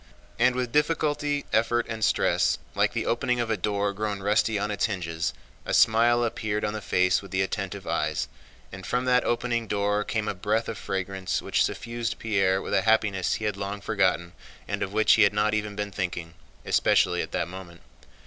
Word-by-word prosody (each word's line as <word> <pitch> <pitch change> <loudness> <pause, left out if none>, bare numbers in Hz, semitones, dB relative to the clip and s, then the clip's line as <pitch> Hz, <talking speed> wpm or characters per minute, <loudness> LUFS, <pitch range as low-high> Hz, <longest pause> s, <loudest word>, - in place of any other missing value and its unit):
And 125 +1 +4
with 125 -2 -2
difficulty, 150 -1 +1
effort, 115 +1 +2
and 110 -1 -4
stress, - - +2 0.2
like - - +1
the - - -2
opening 120 +1 0
of 115 -1 -1
a - - +2
door 100 +1 -1
grown 105 -1 -3
rusty 105 +1 +2
on 105 +1 -2
its 105 - 0
hinges, 85 -6 -2 0.3
a - - -1
smile 120 +2 +4
appeared 110 -2 -2
on 105 - -2
the 110 - -4
face 90 -2 +2
with 100 - -11
the 95 0 +1
attentive 95 0 -4
eyes, - - -1 0.4
and 95 0 -9
from 125 +6 -1
that 125 0 +3
opening 120 -1 -1
door 105 0 0
came 110 0 -2
a 105 - 0
breath 105 +4 -1
of 110 - -5
fragrance 95 0 -2
which - - +1
suffused 115 0 -3
Pierre 95 -4 +1
with - - -5
a 95 - +4
happiness 100 -2 +2
he 110 - -4
had 105 -2 -1
long 100 +1 -4
forgotten 95 -5 0 0.4
and - - -3
of 95 - -2
which 110 +1 +4
he 110 - +4
had 100 -1 +5
not 105 +1 +2
even 105 -1 -2
been 105 0 -3
thinking—especially 85 -9 0
at - - -6
that 85 - -1
moment. 90 -2 -10
105 Hz, 195 wpm, -26 LUFS, 95-115 Hz, 0.4 s, had